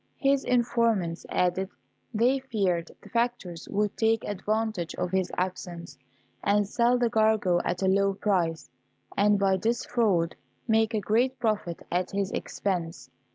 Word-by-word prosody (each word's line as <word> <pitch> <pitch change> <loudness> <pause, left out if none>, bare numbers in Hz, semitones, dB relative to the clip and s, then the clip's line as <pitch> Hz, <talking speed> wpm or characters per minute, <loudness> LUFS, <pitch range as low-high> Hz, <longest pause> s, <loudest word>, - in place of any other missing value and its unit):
His 275 -1 +2
informants 230 -8 +1
added, 180 +1 0 0.4
they 245 +5 +2
feared 195 -10 -1
the - - -13
factors 235 -8 -2
would 210 0 0
take 225 0 +2
advantage 215 -3 -2
of 180 - -2
his 190 -1 0
absence, 180 -2 -4 0.5
and 205 0 +2
sell 240 +3 +2
the 245 -1 +2
cargo 215 -5 +2
at 180 +2 -2
a - - +3
low 195 +1 +3
price, 175 -6 0 0.4
and 205 +1 +4
by 195 -1 +2
this 230 +5 -1
fraud 195 -9 +1 0.3
make 220 0 +2
a - - +2
great 240 +6 +1
profit 215 -8 -2
at 180 +1 0
his 200 0 -2
expense. 175 -4 -3
205 Hz, 145 wpm, -27 LUFS, 180-225 Hz, 0.5 s, and